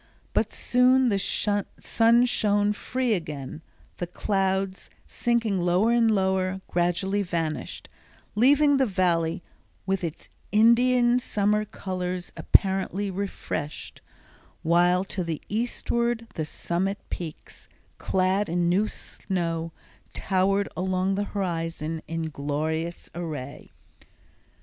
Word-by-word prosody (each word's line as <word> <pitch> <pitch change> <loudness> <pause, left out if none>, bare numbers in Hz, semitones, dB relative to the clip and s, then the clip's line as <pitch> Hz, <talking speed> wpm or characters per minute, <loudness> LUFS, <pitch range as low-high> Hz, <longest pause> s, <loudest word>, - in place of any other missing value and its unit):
But - - +1
soon 255 +1 +3
the 200 -2 +1
sun 225 +4 +2
shone 205 -3 +2
free 250 +2 -1
again, 155 -5 -5 0.4
the 175 - -3
clouds, 190 +1 -1 0.2
sinking 230 -5 0
lower 180 +6 +2
and 235 -1 +4
lower, 190 -2 +1
gradually 180 +3 0
vanished, 165 -4 -3 0.5
leaving 285 +5 +5
the 265 -1 +3
Valley 175 -3 +1 0.4
with 190 -1 -1
its 165 -2 -5 0.2
Indian 240 +3 +5
summer 210 -2 +1
colors 185 -2 -4
apparently 195 0 +2
refreshed, 185 -6 -5 0.6
while 175 +2 +3
to 190 -1 -4
the 165 -3 -3
eastward 235 +1 -1
the 155 - -3
summit 180 +5 -2
peaks, 160 -3 -7 0.3
clad 190 +1 +1
in 175 +1 +1
new 195 +5 +2
snow, 165 -6 -3 0.4
towered 195 +1 +1
along 185 +1 0
the 205 +1 -1
horizon 165 -5 -3
in 165 0 -3
glorious 155 +4 -3
array. 150 -6 -6
190 Hz, 105 wpm, -26 LUFS, 170-210 Hz, 0.6 s, leaving